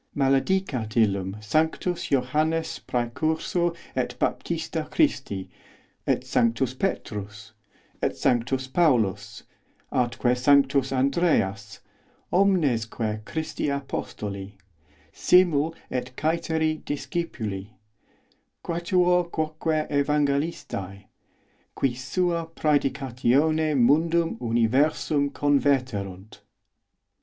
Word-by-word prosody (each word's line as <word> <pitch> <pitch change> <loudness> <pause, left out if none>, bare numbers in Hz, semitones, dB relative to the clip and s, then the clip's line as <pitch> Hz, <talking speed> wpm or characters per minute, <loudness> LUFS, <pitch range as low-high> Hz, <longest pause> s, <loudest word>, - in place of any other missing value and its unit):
Maledicat 135 - +1
os 110 +2 -7
illum 100 -3 +1
sanctus 160 - 0
Johannes 155 +5 0
Præcursor 160 +8 -1 0.2
et - - -1
Baptista - - -2
Christi, 95 -2 0 0.6
et - - +1
sanctus 115 +2 +1
Petrus, 110 - -4 0.5
et - - -1
sanctus 130 +2 0
Paulus, 110 - +1 0.5
atque 125 0 +1
sanctus 135 +1 +3
Andreas, 130 - 0 0.5
omnesque 120 - +1
Christi 160 0 -3
apostoli, 100 -8 -5 0.6
simul 165 -3 +3 0.2
et 125 0 -3
cæteri 160 0 0
discipuli, 115 - -4 1.0
quatuor 175 +1 +2
quoque 155 0 -1
evangelistæ, 140 - -1 0.7
qui 135 -3 +1
sua 170 +6 -1
prædicatione 145 0 +1
mundum 165 +6 +3
universum 135 +5 +2
converte 140 -3 +2
os 100 - -4
runt. 95 +3 -13
140 Hz, 80 wpm, -25 LUFS, 115-160 Hz, 1.0 s, sanctus